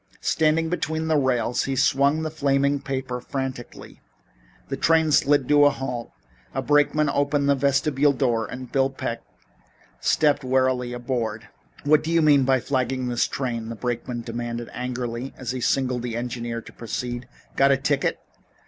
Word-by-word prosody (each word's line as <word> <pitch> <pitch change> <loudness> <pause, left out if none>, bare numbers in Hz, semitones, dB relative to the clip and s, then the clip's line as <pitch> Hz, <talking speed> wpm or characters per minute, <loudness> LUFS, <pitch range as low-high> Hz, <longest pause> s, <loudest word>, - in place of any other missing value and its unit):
Standing 160 0 +2
between 160 -2 -2
the 160 - +3
rails 125 -4 +1
he 135 - -2
swung 140 +4 +2
the 155 - -3
flaming 140 -1 +1
paper 130 -2 -4
frantically. 130 -2 -6 0.7
The - - -3
train 160 -1 +3
slid 145 -2 +3
to 145 0 +6
a - - +7
halt, 125 -4 -5 0.4
a - - 0
brakeman 150 +1 +3
opened 140 0 +1
a - - +6
vestibule 140 +1 +2
door, 120 -5 0
and 125 0 -8
Bill 135 -1 +2
Peck 115 -3 -4 0.8
stepped 145 -2 +2
wearily 130 -1 +1
aboard. 120 -3 -3 0.3
"What 150 +1 +4
do 160 - -4
you 165 -1 +3
mean 145 -3 +5
by 130 0 +3
flagging 130 -1 -1
this 120 -1 +1
train?" 115 -4 -3
the 115 - -5
brakeman 120 +2 -3
demanded 120 0 -5
angrily, 125 0 -4
as 125 -2 -4
he 130 -1 -4
signaled 125 -1 +1
the 120 -1 -4
engineer 120 -1 -4
to - - -14
proceed. 120 +1 -5 0.3
"Got 135 0 +4
a 135 - +4
ticket?" 140 +1 0
130 Hz, 160 wpm, -24 LUFS, 120-145 Hz, 0.8 s, a